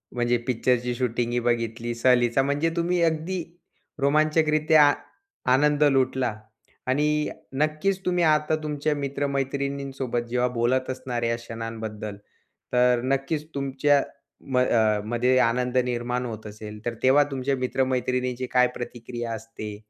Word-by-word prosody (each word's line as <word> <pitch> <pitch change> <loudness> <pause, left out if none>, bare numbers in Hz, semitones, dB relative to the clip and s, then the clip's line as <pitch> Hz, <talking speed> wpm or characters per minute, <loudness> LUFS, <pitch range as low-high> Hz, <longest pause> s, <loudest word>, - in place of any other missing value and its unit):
म्हणजे 120 0 +2
पिक्चरची 125 0 +1
शूटिंग 120 -1 -1
ही 120 - +1
बघितली. 115 0 -1
सहलीचा 120 +1 +3
म्हणजे 145 +4 +1
तुम्ही 175 +1 +1
अगदी 165 +2 0 0.6
रोमांचकरित्या 155 0 +4 0.6
आनंद 150 +2 +3
लुटला. 130 -4 +2 0.5
आणि 140 +3 +2 0.6
नक्कीच 155 +6 +1
तुम्ही 180 -1 +1
आता 155 0 +3
तुमच्या 150 0 -1
मित्र-मैत्रिणींसोबत 140 -2 -2
जेव्हा 125 +1 +1
बोलत 130 +2 +1
असणार 125 -2 -3
या 115 0 +1
क्षणांबद्दल, 115 -3 -6 0.6
तर 125 -1 +4
नक्कीच 135 +4 -1
तुमच्या 140 +1 +2 0.5
म 125 - +3
अ, 110 -4 +3
मध्ये 125 +3 +2
आनंद 125 +1 +1
निर्माण 125 0 -2
होत 110 -2 -7
असेल. 105 0 -9
तर 120 - -1
तेव्हा 135 +3 +6
तुमच्या 135 +1 -1
मित्र-मैत्रिणींची 125 0 -1
काय 125 0 +5
प्रतिक्रिया 120 -1 -6
असते? 110 -1 -7
130 Hz, 120 wpm, -25 LUFS, 120-145 Hz, 0.6 s, तेव्हा